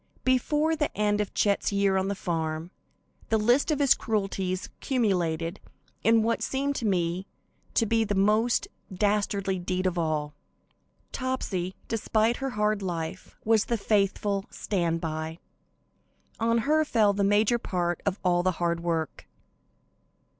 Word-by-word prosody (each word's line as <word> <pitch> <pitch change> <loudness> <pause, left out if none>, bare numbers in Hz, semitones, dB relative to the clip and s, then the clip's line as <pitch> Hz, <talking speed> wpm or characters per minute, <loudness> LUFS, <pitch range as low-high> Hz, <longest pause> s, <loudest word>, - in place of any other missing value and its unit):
Before 295 +5 +2
the 300 -2 0
end 210 0 +2
of 205 - -5
Chet's 200 0 +2
year 200 -1 +2
on 190 0 +1
the 200 - -1
farm, 160 -2 -3 0.6
the 225 - +3
list 240 +8 +3
of 305 - +2
his 280 -2 +5
cruelties 195 -4 -2
culminated 180 - 0 0.4
in 225 0 +4
what 230 +1 0
seemed 280 +1 -1
to 230 - -1
me 180 0 0 0.5
to 230 - +3
be 225 +1 +2
the 205 -2 -1
most 215 +5 +2 0.2
dastardly 200 -1 0
deed 185 +1 -2
of 180 -1 0
all. 155 -2 -1 0.8
Topsy, 200 -9 -2
despite 225 +1 +1
her 270 0 -2
hard 210 0 +1
life, 175 -1 -5
was 220 -1 +3
the 235 - 0
faithful 200 -1 +1
"stand 170 -4 -1
by." 160 0 -4 1.0
On 230 +1 +2
her 310 +1 +4
fell 220 -8 +3
the 200 0 0
major 210 +4 +3
part 175 -4 -2
of 200 -1 -1
all 175 -1 +3
the 185 +1 +1
hard 170 -1 0
work. 165 -2 -3
200 Hz, 145 wpm, -27 LUFS, 180-225 Hz, 1.0 s, his